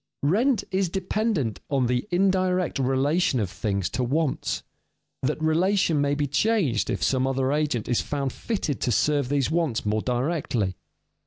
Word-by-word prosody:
_ - - +3
Rent 230 - +2
is 190 -1 +1
dependent 190 - -1
on 135 -3 +1
the 125 - 0
indirect 185 -3 +1
relation 135 +3 +1
of 100 -5 -2
things 100 -1 -1
to 130 - -1
wants; 145 +4 -1 0.6
that - - -1
relation 165 0 +2
may 145 0 +1
be 145 0 0
changed 145 - +1
if - - -2
some 130 0 +2
other 135 0 0
agent 145 -6 0
is 120 - +1
found 140 -3 -3
fitted 195 - -3
to 125 - +1
serve 145 +3 +1
these 140 0 +1
wants 160 -10 0
more 105 +1 +1
directly. 125 - -1
145 Hz, 160 wpm, -25 LUFS, 125-180 Hz, 0.6 s, _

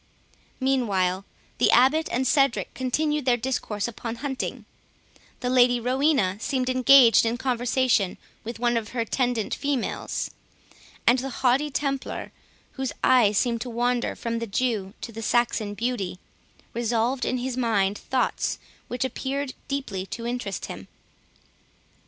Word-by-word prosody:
Meanwhile 200 -9 +1 0.3
the - - +4
Abbot 270 +6 +4
and 255 +2 0
Cedric 275 -2 +2
continued 295 +3 -1
their 245 -2 +3
discourse 230 -4 -2
upon 230 0 -5
hunting; 265 +1 -4 0.8
the 250 - -1
Lady 245 -1 +5
Rowena 250 -5 +2
seemed 255 +1 -1
engaged 255 -3 +7
in 230 +1 0
conversation 245 -5 +1 0.3
with 235 +2 -6
one 240 0 +1
of 225 -2 -2
her 240 - 0
attendant 245 -1 -1
females; 280 -4 -2 0.7
and 245 +2 +5
the 270 +2 -4 0.2
haughty 270 +4 +3
Templar, 275 -1 -3 0.4
whose 265 -1 -4
eye 240 -5 +5 0.3
wandered 245 0 -1
from 230 0 -2
the 230 - -4
Jew 210 -2 -1
to 235 - -6
the 225 0 -7
Saxon 220 -2 +1
beauty, 225 -5 -2 0.6
revolved 235 +2 0
in 255 - 0
his 250 0 -3
mind 210 -5 +1
thoughts 260 -1 -1 0.3
which 250 +1 -2
appeared 270 +1 -3
deeply 210 -9 -3
to 230 +3 -6
interest 240 -5 -3
him. - - -8
245 Hz, 130 wpm, -25 LUFS, 225-260 Hz, 0.8 s, engaged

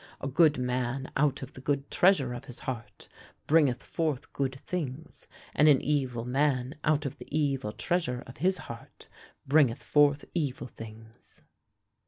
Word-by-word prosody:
A - - -4
good 150 +2 +4
man 125 +1 -2
out 140 -1 +1
of 130 - -9
the 130 - -10
good 140 0 -1
treasure 155 -10 +4
of 120 +2 -7
his 125 -3 -9
heart 125 -4 -6 0.4
bringeth 145 -5 +3
forth 150 -5 -2
good 135 -1 -2
things, 160 -3 -5 0.3
and 150 - +4
an 140 -3 +6
evil 130 -5 -1
man 130 0 +1
out 150 -1 +2
of 140 - -5
the - - -10
evil 140 -6 0
treasure 125 +1 -1
of 130 - -12
his 185 +7 +2
heart 115 -7 -10 0.4
bringeth 135 -4 +3
forth 145 -1 +3
evil 145 -7 -2
things.' 110 -1 -12
135 Hz, 155 wpm, -29 LUFS, 125-150 Hz, 0.4 s, an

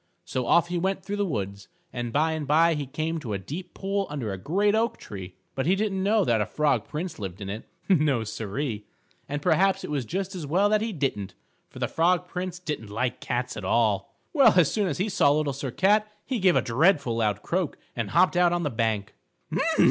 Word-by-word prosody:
So 125 -2 -2
off 170 0 +4
he 175 0 -1
went 190 +1 -1
through 205 +1 -3
the 205 -1 0
woods, 100 - -4 0.3
and 120 -1 -3
by 155 +6 +2
and 155 -3 -3
by 165 +3 +5
he 145 -3 -3
came 160 +4 -2
to 120 -8 -5
a - - 0
deep 165 - -7
pool 195 0 -1
under 130 -9 -3
a - - -4
great 200 - +1
oak 225 +2 +1
tree. 95 -3 -9 0.2
But 135 +2 -2
he 185 - +4
didn't 195 -2 -1
know 205 0 +3
that 115 -2 +2
a - - +1
Frog 145 -7 +1
Prince 160 0 -5
lived 95 -3 -6
in 100 -1 -5
it. 105 +3 -6 0.2
No, 150 - +3
Siree. 110 +1 -4 0.4
And 145 0 -3
perhaps 185 +3 +3
it - - -5
was 140 -3 0
just 190 - -3
as 170 -6 -5
well 190 +7 +3
that 215 0 +3
he 225 +1 -1
didn't, 135 - -2 0.3
for - - -14
the - - -1
Frog 180 +2 +2
Prince 180 0 -4
didn't 150 - -5
like 125 +4 -2
cats 125 0 -2
at 105 - -6
all. 100 -1 +1 0.2
Well, 270 - +6
as 170 -5 +5
soon 210 -3 +1
as 150 - -2
he 190 - 0
saw 185 -8 +3
Little 145 -1 +1
Sir 135 0 -4
Cat, 210 - +2
he 255 -3 -2
gave 185 -2 +4
a - - +3
dreadful 140 -1 +2
loud 105 -2 0
croak 180 -3 -1 0.2
and 115 -4 -2
hopped 180 - +4
out 175 -1 +4
on 175 0 0
the 145 - -1
bank. 110 -3 -1
150 Hz, 225 wpm, -26 LUFS, 115-185 Hz, 0.4 s, Well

